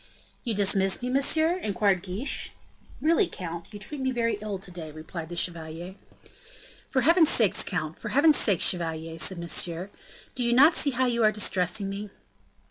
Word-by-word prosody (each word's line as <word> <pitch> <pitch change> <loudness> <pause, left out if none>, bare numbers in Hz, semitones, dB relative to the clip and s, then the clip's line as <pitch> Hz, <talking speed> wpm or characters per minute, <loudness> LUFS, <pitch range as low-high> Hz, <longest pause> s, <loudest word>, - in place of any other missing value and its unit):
"You 230 -3 -2
dismiss 195 +1 +2
me, 250 - -1
monsieur?" 315 +6 +2
inquired 200 - +1
Guiche. 200 +8 -5 0.5
"Really, 335 +5 +3
count, 170 - -7
you 210 - -8
treat 275 +7 -7
me 260 - 0
very 230 -4 -1
ill 210 -2 -4
to 190 -1 -9
day," 170 -3 -8
replied 160 +2 -8
the 175 - -6
chevalier. 170 +1 -5 1.0
"For 260 - +1
heaven's 330 +1 +5
sake, 220 -5 +3
count, 160 -4 -3
for - - -5
heaven's 295 +3 +5
sake, 195 -6 +2
chevalier," 165 -2 0
said 190 +3 0
Monsieur, 170 +2 -2 0.4
"do 255 - -5
you 240 0 +2
not 285 +7 +7
see 290 - +3
how 260 -1 +1
you 235 -2 +1
are 215 - +5
distressing 200 -1 0
me?" 200 +1 -5
200 Hz, 175 wpm, -27 LUFS, 175-250 Hz, 1.0 s, not